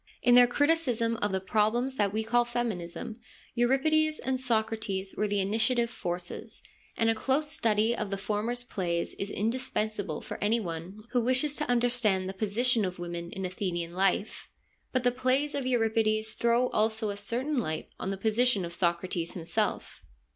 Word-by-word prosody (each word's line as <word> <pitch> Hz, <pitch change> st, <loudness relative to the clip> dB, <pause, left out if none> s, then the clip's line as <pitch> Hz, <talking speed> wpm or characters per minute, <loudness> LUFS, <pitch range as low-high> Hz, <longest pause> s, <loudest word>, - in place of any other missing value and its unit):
In 245 Hz, -, +5 dB
their 245 Hz, 0 st, +8 dB
criticism 250 Hz, -5 st, +1 dB
of 205 Hz, -2 st, 0 dB
the 190 Hz, -, 0 dB
problems 220 Hz, +7 st, +1 dB
that 205 Hz, -2 st, +2 dB
we 220 Hz, +2 st, -1 dB
call 240 Hz, +2 st, +3 dB
feminism 225 Hz, -3 st, -4 dB, 0.3 s
Euripides 310 Hz, +6 st, +2 dB
and 260 Hz, 0 st, -2 dB
Socrates 220 Hz, -5 st, 0 dB
were 210 Hz, -, 0 dB
the 205 Hz, 0 st, 0 dB
initiative 225 Hz, +4 st, +2 dB
forces, 175 Hz, -3 st, -5 dB, 0.3 s
and 225 Hz, -, +2 dB
a 225 Hz, -, +4 dB
close 270 Hz, +7 st, 0 dB
study 220 Hz, -1 st, +2 dB
of 215 Hz, -, -3 dB
the 195 Hz, -, -2 dB
former's 220 Hz, +5 st, -2 dB
plays 175 Hz, -7 st, -2 dB
is 200 Hz, -, -3 dB
indispensable 215 Hz, -6 st, -2 dB
for -, -, -6 dB
any 220 Hz, +3 st, +3 dB
one 180 Hz, +2 st, -6 dB
who 245 Hz, -, +2 dB
wishes 255 Hz, +5 st, +2 dB
to 300 Hz, -2 st, -1 dB
under 245 Hz, 0 st, +3 dB
stand 210 Hz, -6 st, +1 dB
the 190 Hz, -, -4 dB
position 220 Hz, +4 st, +2 dB
of 185 Hz, -1 st, -3 dB
women 170 Hz, -1 st, -5 dB
in 190 Hz, -1 st, -4 dB
Athenian 175 Hz, -2 st, -3 dB
life. 195 Hz, +3 st, 0 dB, 0.4 s
But 255 Hz, -1 st, 0 dB
the 245 Hz, -, +4 dB
plays 255 Hz, +4 st, +1 dB
of 275 Hz, -2 st, -2 dB
Euripides 220 Hz, -2 st, +1 dB
throw 235 Hz, +2 st, +2 dB
also 220 Hz, 0 st, 0 dB
a -, -, -5 dB
certain 245 Hz, +8 st, -1 dB
light 155 Hz, -8 st, -3 dB
on 190 Hz, -, -3 dB
the 195 Hz, -, -2 dB
position 220 Hz, -1 st, +2 dB
of 170 Hz, -, -7 dB
Socrates 170 Hz, -1 st, -1 dB
himself. 165 Hz, -2 st, -2 dB
220 Hz, 170 wpm, -29 LUFS, 195-245 Hz, 0.4 s, their